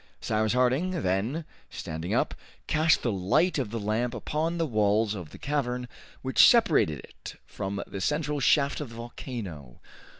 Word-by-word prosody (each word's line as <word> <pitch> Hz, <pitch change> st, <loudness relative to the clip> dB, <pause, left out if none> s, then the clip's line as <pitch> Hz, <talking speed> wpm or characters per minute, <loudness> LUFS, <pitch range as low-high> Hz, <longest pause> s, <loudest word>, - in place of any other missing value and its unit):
Cyrus 110 Hz, 0 st, 0 dB
Harding 135 Hz, +8 st, +1 dB
then, 110 Hz, -, -1 dB, 0.2 s
standing 80 Hz, +2 st, -5 dB
up, -, -, +1 dB, 0.3 s
cast 155 Hz, +1 st, +3 dB
the 120 Hz, -, +1 dB
light 100 Hz, -, +2 dB
of 125 Hz, -6 st, -2 dB
the 115 Hz, +2 st, -4 dB
lamp 110 Hz, +4 st, -1 dB
upon 155 Hz, +8 st, -2 dB
the 165 Hz, -, +1 dB
walls 105 Hz, -3 st, +2 dB
of 90 Hz, -7 st, -7 dB
the -, -, -12 dB
cavern 125 Hz, -3 st, -2 dB, 0.4 s
which 130 Hz, 0 st, +7 dB
separated 160 Hz, -, +4 dB
it -, -, -11 dB
from 100 Hz, 0 st, -4 dB
the 100 Hz, -, -7 dB
central 150 Hz, +3 st, 0 dB
shaft 140 Hz, +1 st, +3 dB
of 145 Hz, -, -5 dB
the 115 Hz, -, -11 dB
volcano. 110 Hz, -, -7 dB
120 Hz, 160 wpm, -28 LUFS, 100-150 Hz, 0.4 s, which